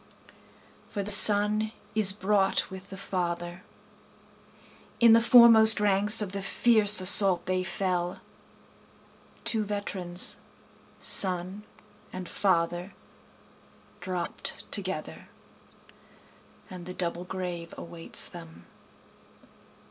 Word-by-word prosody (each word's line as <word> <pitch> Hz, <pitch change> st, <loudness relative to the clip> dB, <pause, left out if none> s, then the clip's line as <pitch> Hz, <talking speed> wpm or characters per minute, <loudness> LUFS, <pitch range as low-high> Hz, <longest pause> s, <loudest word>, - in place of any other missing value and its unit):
For 200 Hz, -, -6 dB
the 205 Hz, -, -6 dB
son 210 Hz, +1 st, +5 dB, 0.2 s
is 215 Hz, -3 st, +4 dB
brought 195 Hz, -1 st, -2 dB
with 190 Hz, +1 st, -11 dB
the 195 Hz, -, -11 dB
father, 175 Hz, -2 st, -6 dB, 1.4 s
(In 235 Hz, -1 st, +5 dB
the 230 Hz, -, +4 dB
foremost 230 Hz, -2 st, +6 dB
ranks 210 Hz, +1 st, +3 dB
of 195 Hz, -, -8 dB
the 200 Hz, 0 st, -6 dB
fierce 210 Hz, 0 st, +3 dB
assault 190 Hz, -1 st, +5 dB
they 185 Hz, 0 st, -3 dB
fell, 180 Hz, -1 st, -4 dB, 1.2 s
Two 220 Hz, -2 st, 0 dB
veterans 195 Hz, -4 st, -1 dB, 0.6 s
son 185 Hz, +1 st, -1 dB, 0.5 s
and 185 Hz, -1 st, -9 dB
father 175 Hz, -1 st, -3 dB, 1.0 s
dropt 180 Hz, -2 st, -4 dB
together, -, -, -5 dB, 1.4 s
And 180 Hz, -3 st, -12 dB
the 180 Hz, -, -9 dB
double 175 Hz, 0 st, -4 dB
grave 180 Hz, -2 st, -8 dB
awaits 170 Hz, -1 st, -3 dB
them.) 165 Hz, -2 st, -14 dB
190 Hz, 95 wpm, -25 LUFS, 180-210 Hz, 1.4 s, foremost